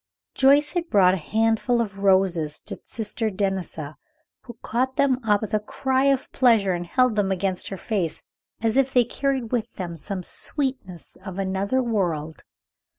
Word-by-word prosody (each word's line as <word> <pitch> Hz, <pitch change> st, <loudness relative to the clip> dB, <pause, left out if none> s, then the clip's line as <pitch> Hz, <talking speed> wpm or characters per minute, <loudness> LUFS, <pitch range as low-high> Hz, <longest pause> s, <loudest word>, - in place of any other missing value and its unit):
Joyce 285 Hz, +2 st, +4 dB
had 345 Hz, -2 st, -2 dB
brought 185 Hz, -3 st, +5 dB
a -, -, 0 dB
handful 225 Hz, +6 st, +1 dB
of 200 Hz, -4 st, -3 dB
roses 185 Hz, -6 st, +2 dB
to -, -, -6 dB
Sister 220 Hz, 0 st, -2 dB
Denisa, 190 Hz, -7 st, -3 dB, 0.5 s
who 240 Hz, -2 st, -10 dB
caught 260 Hz, +3 st, -1 dB
them 265 Hz, -3 st, +2 dB
up 210 Hz, -2 st, +2 dB
with 215 Hz, -, -5 dB
a 215 Hz, -, +3 dB
cry 265 Hz, +5 st, 0 dB
of 275 Hz, -1 st, +1 dB
pleasure, 225 Hz, -7 st, +3 dB
and 175 Hz, -1 st, -3 dB
held 255 Hz, +2 st, +2 dB
them 200 Hz, -2 st, +1 dB
against 190 Hz, 0 st, -2 dB
her 195 Hz, -, -5 dB
face 185 Hz, -4 st, -2 dB, 0.4 s
as 225 Hz, +2 st, +1 dB
if 270 Hz, -1 st, +3 dB
they 250 Hz, -2 st, +5 dB
carried 265 Hz, -2 st, -2 dB
with 240 Hz, -3 st, -2 dB
them 175 Hz, -3 st, -5 dB
some 185 Hz, +4 st, -3 dB
sweetness 255 Hz, -, -3 dB
of 190 Hz, -2 st, -7 dB
another 195 Hz, +6 st, 0 dB
world. 170 Hz, -9 st, -2 dB
210 Hz, 165 wpm, -24 LUFS, 190-255 Hz, 0.5 s, brought